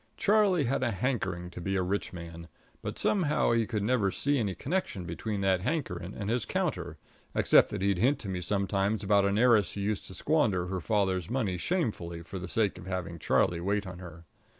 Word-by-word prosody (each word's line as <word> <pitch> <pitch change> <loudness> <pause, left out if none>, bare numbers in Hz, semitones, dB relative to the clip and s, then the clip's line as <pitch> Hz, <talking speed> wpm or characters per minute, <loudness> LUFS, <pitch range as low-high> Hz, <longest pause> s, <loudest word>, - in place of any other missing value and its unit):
Charlie 205 -6 +3
had 135 +1 0
a 130 - +1
hankering 95 -7 -2
to 90 - -8
be 95 +2 -1
a 95 - +1
rich 100 +3 -2
man; 85 -1 -9 0.3
but - - -5
somehow 160 - +2
he 115 -2 +2
could 105 -4 -2
never 110 -3 +2
see 140 +8 0
any 100 -5 -1
connection 135 - -2
between 105 +1 -3
that 95 -2 +2
hankering 95 - -3
and 100 - -5
his 115 +1 0
counter, - - -2 0.4
except - - +5
that 100 -2 -4
he'd 100 -2 +2
hint 135 +7 +3
to 105 - -6
me 90 -2 -3
sometimes 100 +2 0
about 100 0 +4
an 100 +1 +1
heiress 115 -3 +4
who 100 - -4
used 105 0 -2
to 95 - -9
squander 110 - +1
her 90 0 -3
father's 95 -5 0
money 115 -8 0
shamefully 90 - -2
for 95 +3 -7
the 95 - -6
sake 105 -5 0
of 90 - -10
having 90 -3 -4
Charlie 85 +2 +2
wait 100 +3 0
on 95 -1 -8
her. 85 -2 -11
100 Hz, 205 wpm, -29 LUFS, 90-115 Hz, 0.4 s, except